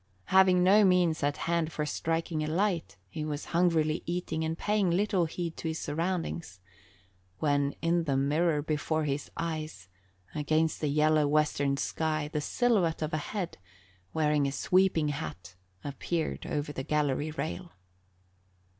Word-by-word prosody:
Having 185 -1 +6
no 200 +3 +6
means 180 -4 +3
at 145 0 0
hand 170 -1 0
for 150 0 -2
striking 165 +1 -1
a - - -2
light, 165 - -1
he 150 +11 -5
was 150 -1 -4
hungrily 165 -2 +2
eating 170 -2 -2
and 160 +1 -2
paying 205 -2 +1
little 185 0 +2
heed 165 +1 -4
to - - -4
his 160 0 -2
surroundings, 165 - -3 0.8
when 145 -2 +1
in 170 0 +2
the 140 -3 +1
mirror 150 +2 +1
before 155 +1 -1
his 145 -1 -2
eyes, 155 - -4 0.4
against 155 +1 0
the 150 - +1
yellow 155 0 +3
western 145 -2 +1
sky 155 0 -1
the 150 - 0
silhouette 185 -6 +1
of 155 - -3
a - - +2
head 180 - -4 0.5
wearing 150 -2 +2
a - - -1
sweeping 170 +2 +2
hat 90 - -6 0.3
appeared 155 +3 -3
over 145 0 -2
the 135 - -4
gallery 145 +1 0
rail. 165 +3 -5
155 Hz, 145 wpm, -29 LUFS, 150-170 Hz, 0.8 s, Having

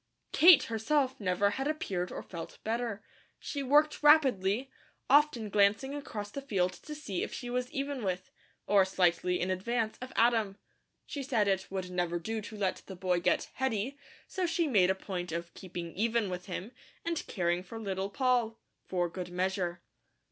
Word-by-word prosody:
Kate, 345 -2 +8
herself, 260 +4 0
never 200 0 +2
had 270 +6 -2
appeared 190 - -2
or - - -6
felt 170 -3 -8
better. 225 -1 -2 0.3
She 285 - -4
worked 295 +3 +3
rapidly, 265 -6 +4 0.4
often 285 -6 +4
glancing 205 +6 +2
across 215 -8 -5
the 280 - -5
field 185 -9 0
to 300 - -9
see 210 -12 -4
if - - -3
she 245 -1 -5
was 250 0 -1
even 275 -2 -3
with, 185 -1 -3 0.3
or 200 -2 +5
slightly 180 -1 +1
in 185 - 0
advance 220 +4 -1
of 255 0 -6
Adam. 225 -4 +3 0.5
She 285 - -5
said 240 -6 +1
it 190 -1 0
would 185 -1 -4
never 175 -1 0
do 220 +6 -3
to 215 +1 -9
let 195 -2 -1
the 190 - -7
boy 180 -1 +1
get 175 - +1
"heady," 265 0 -1 0.3
so 370 -2 -1
she 330 0 +1
made 195 -9 +4
a 190 - +3
point 180 -3 -5
of 170 +1 -4
keeping 175 -2 -7
even 225 -1 0
with 180 +1 -5
him, 190 +4 -5 0.3
and 335 -1 -1
caring 175 -1 0
for 205 +5 -8
Little 195 -2 -3
Poll, 240 0 +1 0.3
"for 175 -2 0
good 180 +1 -6
measure." 180 -1 -2
205 Hz, 175 wpm, -31 LUFS, 185-255 Hz, 0.5 s, Kate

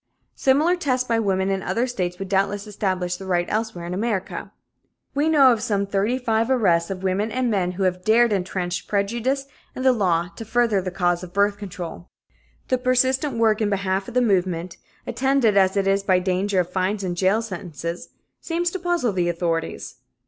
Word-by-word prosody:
Similar 300 +7 +2
tests 255 -6 0
by 230 -1 +1
women 195 -2 0
in 195 -1 -1
other 235 +5 0
states 180 -8 -3
would 195 - -5
doubtless 200 +1 0
establish 185 -4 -2
the 190 - -9
right 175 -1 +1
elsewhere 215 -5 -2
in 175 - -4
America. 200 -1 -3 0.6
We 290 +3 +1
know 280 -5 +6
of 230 -3 0
some 205 -4 0
thirty 200 +5 0
five 230 -2 0
arrests 175 -10 +2
of 190 -1 -5
women 195 +4 0
and 250 -1 0
men 180 -3 0
who 190 +2 -2
have 180 -1 0
dared 225 +1 +4
entrenched 180 -2 -2
prejudice 235 +7 -1 0.3
and 260 - -4
the 260 - +6
law 175 -6 +1
to - - -5
further 225 -3 +1
the 185 - -3
cause 175 -1 0
of 180 -1 -10
birth 200 +1 +2
control. 180 -3 -7 0.6
The 255 - +2
persistent 255 +1 +1
work 225 -1 +2
in 210 - +1
behalf 195 -1 -1
of - - -9
the 250 - +4
movement, 180 -4 0 0.3
attended 265 -5 +2
as 190 0 +3
it 195 - +2
was 195 +1 +2
by 190 -2 +3
danger 185 +2 0
of 175 0 -6
fines 190 +2 -1
and 180 -2 -2
jail 195 +5 +2
sentences, 175 -4 -6 0.3
seemed 340 +1 -2
to 375 - -3
puzzle 345 - 0
the 175 -2 0
authorities. 170 -1 -3
200 Hz, 190 wpm, -23 LUFS, 185-235 Hz, 0.6 s, know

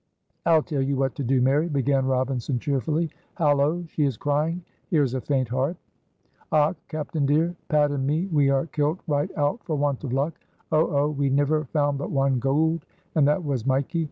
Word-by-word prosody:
"I'll 160 -2 +5
tell 145 -5 -2
you 135 +1 0
what 135 -1 0
to 140 - -4
do, 130 0 +2
Mary," 145 +6 +2
began 135 -2 +1
Robinson, 130 0 0
cheerfully. 150 +4 -1 0.2
"Hallo! 150 +1 +2
she 155 -1 -2
is 135 -6 0
crying. 155 +4 -1 0.3
Here 155 -3 +3
is 130 -3 -1
a 130 - -2
faint 130 -3 0
heart." 135 +8 -1 0.7
"Och! 155 +3 +3
captain 155 -2 -2
dear, 160 +5 +2
Pat 150 -3 +3
an' 135 -2 -1
me 155 +5 +1
we 145 -3 +3
are 135 +1 +2
kilt 155 +2 -1
right 150 +1 0
out 145 +10 0
for 160 - -2
want 145 -2 -1
of 135 - -4
luck. 140 +5 -1 0.3
Oh! 155 +1 +3 0.2
oh! 150 - +1
We 140 -2 0
niver 145 +3 +2
found 145 0 0
but - - -4
one 135 -2 +1
gould 155 +5 +1 0.3
and 150 -3 +4
that 150 +5 +1
was 130 -5 -2
mikee. 135 +5 +1
145 Hz, 195 wpm, -25 LUFS, 135-155 Hz, 0.7 s, I'll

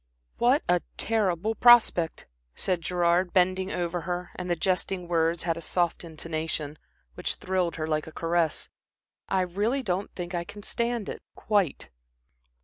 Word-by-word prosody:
"What 255 +5 +4
a 175 0 +3 0.2
terrible 215 -2 +1
prospect!" 225 -9 +5 0.3
said 180 -3 -1
Gerard, 175 +1 +1
bending 185 0 +2
over 175 0 -2
her 180 0 -4
and 180 -1 -5
the 175 - +2
jesting 180 +1 -1
words 165 0 +1
had 165 -1 0
a - - -6
soft 175 +2 0
intonation, 160 -2 -4 0.3
which - - -2
thrilled 185 -2 -1
her 155 - -2
like 155 -1 -1
a - - -8
caress. 165 -1 0 0.6
"I 190 - +2
really 205 +9 0
don't 190 -2 -1
think 175 0 -5
I 170 -1 -1
can 205 +3 -11
stand 235 -2 -1
it - - -6
quite." 195 - 0
180 Hz, 150 wpm, -27 LUFS, 165-195 Hz, 0.6 s, prospect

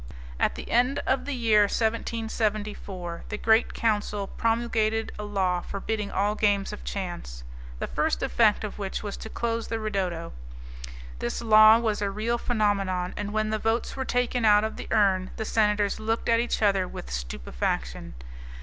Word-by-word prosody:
At - - +1
the - - -8
end 250 +4 +3
of 260 -1 +1
the 285 -1 -3
year 220 -4 +4
1774 215 -5 -2
the 210 - -3
Great 220 +2 +3
Council 210 -2 0
promulgated 225 0 0
a - - -4
law 190 -4 0
forbidding 210 +2 -3
all 200 +2 +1
games 205 -1 +1
of 210 - -8
chance, 175 - -5 0.3
the - - -3
first - - -1
effect 220 -3 +3
of 210 0 -6
which 195 0 -4
was 205 -1 -4
to 220 - -8
close 230 0 -2
the 225 - -2
'ridotto'. 190 -6 -3 0.9
This 120 - -3
law 215 0 +8
was 220 -3 -1
a 200 - 0
real 225 +4 -1
phenomenon, 200 -6 0
and 205 0 -4
when 215 0 0
the 215 - 0
votes 225 +2 -1
were 265 - -2
taken 245 -1 0
out 210 -1 +6
of 220 - -2
the - - -8
urn 190 -3 +2
the 220 - -4
senators 210 -2 +1
looked 225 +2 -1
at 230 0 +4
each 235 -1 -1
other 195 -3 +3
with 60 - -8
stupefaction. - - -3
210 Hz, 170 wpm, -26 LUFS, 195-225 Hz, 0.9 s, law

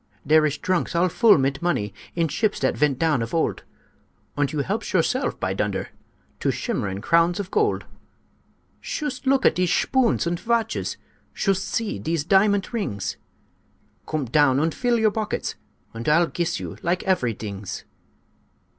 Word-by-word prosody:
"Dere 155 +1 +5
ish 145 0 -3
drunks 185 +1 -1
all 175 +2 +3
full 220 +3 +5
mit 135 0 0
money 105 - -1 0.2
In 165 -1 +1
ships 205 +8 0
dat 130 - +1
vent 145 -3 +2
down 155 -4 +2
of 115 +7 -3
old; 165 - 0 0.7
Und 145 -1 0
you 150 -2 -1
helpsh - - -3
yourself, - - +1
by - - -1
dunder! - - -2 0.5
To - - 0
shimmerin 100 0 -2
crowns 170 +2 +3
of 200 -1 -5
gold. - - +1 0.9
"Shoost 280 -3 -4
look 270 0 +3
at - - +6
dese 180 -1 +1
shpoons 255 +2 +2
und 170 0 -1
vatches! 230 -1 -1 0.4
Shoost 195 -1 0
see 225 -2 -2
dese 160 -2 -1
diamant 200 +4 +3
rings! 100 - -3 0.9
Coom 155 -3 -2
down 135 +1 +3
und 160 +2 +1
full 245 -2 +1
your 220 -1 +3
bockets, 215 0 -2 0.4
Und 115 +4 -3
I'll 165 +3 +5
giss 170 0 -2
you - - -7
like 180 +3 -1
avery 125 - +1
dings. 100 -2 -6
170 Hz, 160 wpm, -24 LUFS, 140-200 Hz, 0.9 s, at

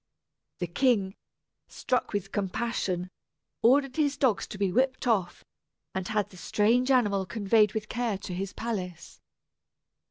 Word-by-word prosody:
The 180 - -2
king, 200 0 +1 0.5
struck 250 - -1
with 200 -1 -3
compassion, 190 -3 -2 0.5
ordered 270 +3 +3
his 290 -2 +1
dogs 250 -7 +1
to - - -8
be 195 -2 +1
whipped 260 +5 +1
off, 195 -7 0 0.5
and 190 -1 -3
had 215 -2 -1
the 185 - -13
strange 230 +8 +2
animal 205 -7 +2
conveyed 210 0 +2
with 215 0 -2
care 235 -4 -1
to 190 -1 -7
his 190 +2 -3
palace. 185 -7 -5
210 Hz, 135 wpm, -28 LUFS, 190-245 Hz, 0.5 s, ordered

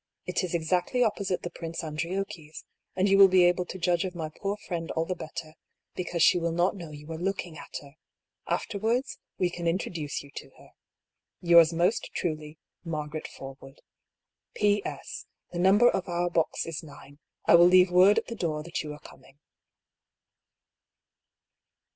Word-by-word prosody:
It 180 +1 -1
is 180 -1 -2
exactly 180 +9 0
oppo» 225 -4 +2
8it€ 195 -2 -2
the 175 - -5
Prince 165 0 -6
Andriocchi's, 160 0 -5 0.3
and 190 +1 +2
you 195 0 +4
will 195 - +10
be 185 -1 +5
able 175 0 +3
to - - -6
judge 175 -1 +1
of 185 -1 -5
my 160 -2 -4
poor 200 +6 -4
friend 170 -5 -5
all 160 - -1
the 185 - -2
better, 155 -2 -8 0.4
because 175 -2 -1
she 175 - +5
will 170 0 -1
not 175 +4 +1
know 170 -5 -8
you 150 +1 -10
are 160 - -5
look 195 +2 -2
ing 170 -3 -12
at - - -12
her. 140 +2 -16 0.5
Afterwards, 230 +5 -1 0.2
we 180 -1 +1
can 170 -1 -4
introduce 165 -3 -2
you 140 - -15
to - - -8
her. - - -18 0.4
" - - -61
Yours 170 -1 +8
most 175 +6 +1
truly, 155 -2 -3 0.2
" - - -58
Margaret 155 -2 -4
Forwood. 135 0 -11 0.4
" - - -61
P. 205 -1 +2
S. - - -7
— - - -48
The 175 - -3
number 200 +6 +5
of 190 -5 0
our 175 0 -1
box 165 -2 0
is 165 -1 -5
9. 145 -2 -14 0.3
I - - +5
will 170 +1 +8
leave 180 0 +6
word 185 +3 +6
at - - +1
the - - -6
door 155 -6 -2
that 170 - -4
you 150 - -6
are 150 - -11
coming." 135 - -16
175 Hz, 190 wpm, -28 LUFS, 160-185 Hz, 0.5 s, will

